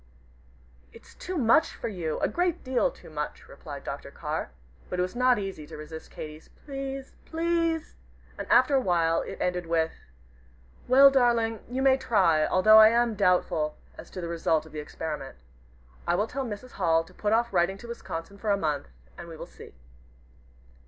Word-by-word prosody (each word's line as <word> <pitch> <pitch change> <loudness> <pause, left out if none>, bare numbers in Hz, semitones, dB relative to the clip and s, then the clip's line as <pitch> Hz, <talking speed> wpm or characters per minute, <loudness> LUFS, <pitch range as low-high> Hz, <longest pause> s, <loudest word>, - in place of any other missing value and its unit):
"It's - - -16
too 370 0 -5
much 250 +4 +3
for - - -5
you, 175 -7 -3
a - - +3
great 350 -1 -1
deal 260 +1 +1
too - - -15
much," 150 -1 -5
replied - - -9
Dr. - - -6
Carr. - - -4 0.4
But 180 - -3
it 180 - +2
was 185 +5 -5
not 250 0 +4
easy 195 -7 -5
to - - -9
resist 155 +1 -9
Katy's 155 0 -9 0.2
"Please! 275 -1 -5
Please!" 330 -1 -1 0.4
and - - -6
after 255 +3 +5
a 270 - +4
while 170 -5 +2
it - - -7
ended 180 -1 -1
with 165 -1 +1 1.0
"Well, 275 +2 +8
darling, 235 -4 +2
you 260 +2 -2
may 265 -1 +5
try, 170 -11 +3 0.2
though 215 0 +9
I 215 - +10
am 235 0 +2
doubtful 170 -6 +1 0.2
as - - -11
to 185 - -7
the 170 - -4
result 165 -2 0
of 160 - -14
the 155 - -6
experiment. 150 - -6 0.7
I 175 - +3
will 205 - +1
tell 270 +4 -4
Mrs. 230 +2 -7
Hall 165 -3 +2
to - - -18
put 210 - -2
off 235 +1 +2
writing 175 +3 +2
to 235 - -11
Wisconsin 200 -4 -7
for 215 - -3
a 200 - +3
month, 150 -6 -2 0.3
and 170 - -8
we 165 -1 -9
will - - -7
see. - - -14
200 Hz, 185 wpm, -27 LUFS, 165-255 Hz, 1.0 s, I